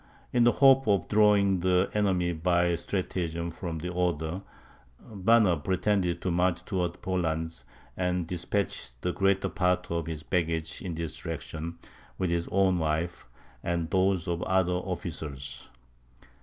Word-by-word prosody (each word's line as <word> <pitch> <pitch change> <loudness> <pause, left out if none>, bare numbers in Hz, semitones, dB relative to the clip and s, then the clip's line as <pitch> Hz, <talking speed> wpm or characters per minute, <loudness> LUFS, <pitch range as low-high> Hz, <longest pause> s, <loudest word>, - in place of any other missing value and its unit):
In 120 -1 +4
the 120 - +5
hope 135 -2 +6
of 100 -2 +2
drawing 105 -3 +4
the 90 +1 +2
enemy 95 -4 +1
by 85 +1 +2
stratagem 85 -2 -2
from 85 0 -5
the 90 +3 -4
Oder, 85 0 -1 0.6
Banner 105 -3 +3
pretended 90 +2 0
to 90 - 0
march 90 0 +1
towards 90 -3 -2
Poland, 80 -3 -2 0.3
and 90 -1 0
despatched 85 -8 -3
the 90 - 0
greater 95 0 +2
part 90 -1 0
of 85 -1 -1
his 80 -2 -5
baggage 80 -3 -1
in 90 -3 -4
this 80 -2 -4
direction, 80 +1 -5 0.4
with 90 -2 0
his 85 0 0
own 95 -2 +2
wife, 80 +1 -2 0.4
and 85 -1 -1
those 95 -2 +2
of 85 -1 -1
the - - -3
other 95 -1 +2
officers. 75 -7 -5
90 Hz, 140 wpm, -28 LUFS, 85-95 Hz, 0.6 s, hope